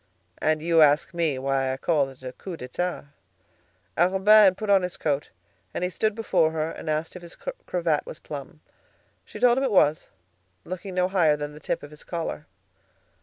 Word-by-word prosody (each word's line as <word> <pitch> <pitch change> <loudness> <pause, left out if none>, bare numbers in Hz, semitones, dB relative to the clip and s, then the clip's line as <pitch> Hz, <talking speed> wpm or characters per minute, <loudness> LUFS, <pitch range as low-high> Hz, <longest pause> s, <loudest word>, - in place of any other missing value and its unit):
"And 155 0 +1
you 165 -1 +4
ask 150 +3 +4
me 165 -5 0
why 135 0 0
I 130 - -3
call 145 -1 +1
it 130 -1 -16
a 130 0 -6
coup 180 +3 -8
d'état?" 155 +3 -4 0.9
Arobin 195 +5 +6
had 190 -1 +4
put 215 -2 -1
on 195 -1 +6
his 180 -1 -4
coat, 145 -2 -1 0.5
and - - -2
he 180 - -1
stood 215 +3 0
before 215 -8 +2
her 160 0 -1
and - - -7
asked 155 +3 -2
if 180 - -8
his 170 0 -11 0.3
cravat 165 -4 0
was - - -7
plumb. 145 +1 -9 0.6
She - - -10
told 245 +1 +4
him - - -1
it 265 - 0
was, 155 -6 +3 0.6
looking 185 +1 -6
no 180 0 +2
higher 170 -6 +3
than 145 0 -5
the 150 - -11
tip - - -3
of 145 - -10
his 150 - -12
collar. 165 -3 -5
165 Hz, 195 wpm, -25 LUFS, 150-185 Hz, 0.9 s, Arobin